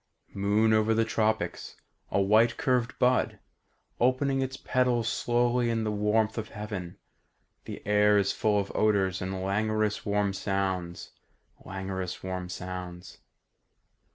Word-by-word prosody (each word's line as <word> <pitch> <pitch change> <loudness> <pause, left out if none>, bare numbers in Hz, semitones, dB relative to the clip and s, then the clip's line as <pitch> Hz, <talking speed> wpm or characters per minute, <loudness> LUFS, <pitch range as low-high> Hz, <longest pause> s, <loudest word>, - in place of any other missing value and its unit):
"Moon 105 +3 +2
over 110 +1 +3
the 115 0 +2
tropics, 110 0 -1 0.3
A - - +1
white 110 +4 +4
curved 130 -5 0
bud 125 0 +2 0.6
Opening 135 +2 +2
its 130 0 -3
petals 125 -4 +1
slowly 120 0 +1
in 115 -1 0
the 105 - -1
warmth 105 +2 +1
of 110 - -6
heaven. 105 -5 -6 0.7
The - - -8
air 105 0 +4
is 100 -1 +2
full 105 -1 +1
of 100 - -3
odours 100 -4 +1
And 95 0 -3
languorous 105 +2 0
warm 100 -1 0
sounds... 95 -3 -3 0.5
languorous 95 -1 -5
warm 90 -1 -4
sounds. 90 -1 -7
105 Hz, 125 wpm, -28 LUFS, 95-115 Hz, 0.7 s, white